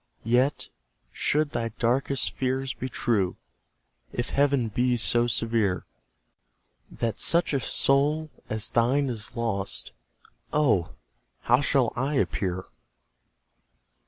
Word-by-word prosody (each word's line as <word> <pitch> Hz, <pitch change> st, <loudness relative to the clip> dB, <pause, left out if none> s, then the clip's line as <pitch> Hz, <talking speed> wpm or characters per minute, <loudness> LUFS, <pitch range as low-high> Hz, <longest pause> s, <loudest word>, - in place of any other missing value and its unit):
Yet, 125 Hz, +5 st, +1 dB, 0.4 s
should 150 Hz, 0 st, 0 dB
thy 115 Hz, -1 st, -2 dB
darkest 125 Hz, +4 st, 0 dB
fears 130 Hz, 0 st, -1 dB
be 130 Hz, -, -5 dB
true, 105 Hz, -7 st, 0 dB, 0.7 s
If 120 Hz, -, -3 dB
Heaven 140 Hz, -4 st, +2 dB
be 125 Hz, +3 st, +1 dB
so 120 Hz, +1 st, +3 dB
severe, 115 Hz, -5 st, 0 dB, 1.0 s
That 115 Hz, -3 st, -3 dB
such 170 Hz, -2 st, +3 dB
a 140 Hz, -, +2 dB
soul 145 Hz, +5 st, +1 dB, 0.2 s
as 110 Hz, -1 st, +1 dB
thine 130 Hz, +4 st, +2 dB
is 110 Hz, -2 st, -6 dB
lost, 100 Hz, -4 st, -2 dB, 0.6 s
Oh! 120 Hz, -, +1 dB, 0.5 s
how 120 Hz, +3 st, +3 dB
shall 135 Hz, -4 st, +2 dB
I 135 Hz, +4 st, -1 dB
appear? 95 Hz, -8 st, -1 dB
120 Hz, 105 wpm, -26 LUFS, 115-140 Hz, 1.0 s, so